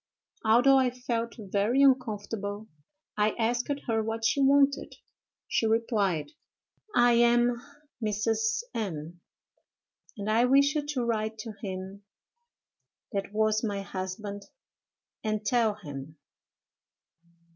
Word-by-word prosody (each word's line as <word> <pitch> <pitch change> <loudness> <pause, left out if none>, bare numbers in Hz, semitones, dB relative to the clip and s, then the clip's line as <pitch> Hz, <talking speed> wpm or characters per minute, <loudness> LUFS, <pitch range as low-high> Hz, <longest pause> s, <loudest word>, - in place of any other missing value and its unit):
"'Although 245 +5 +5
I 260 -1 +3
felt 235 -2 -3
very 210 +5 +1
uncomfortable, 215 -5 0 0.5
I 210 0 +2
asked 240 +2 0 0.2
her 225 -2 +1
what 225 +1 -3
she 280 - +2
wanted. 275 +1 +3 0.5
She 225 - +1
replied, 205 - 0 0.6
"I 240 0 +5
am 240 0 +3 0.4
Mrs. 225 - 0
M——, 170 -5 -5 1.0
and 205 0 -5
I 225 +3 +3
wish 280 +2 +4
you 300 -2 -1
to 265 -5 -1
write 220 -1 -1
to 225 - -7
him 190 0 -6 1.1
that 200 -2 -3
was 215 +1 +1
my 200 -3 -2
husband, 200 +2 -6 0.8
and 215 -1 -2
tell 225 -1 +2
him....." 150 -5 -9
220 Hz, 110 wpm, -28 LUFS, 200-240 Hz, 1.1 s, Although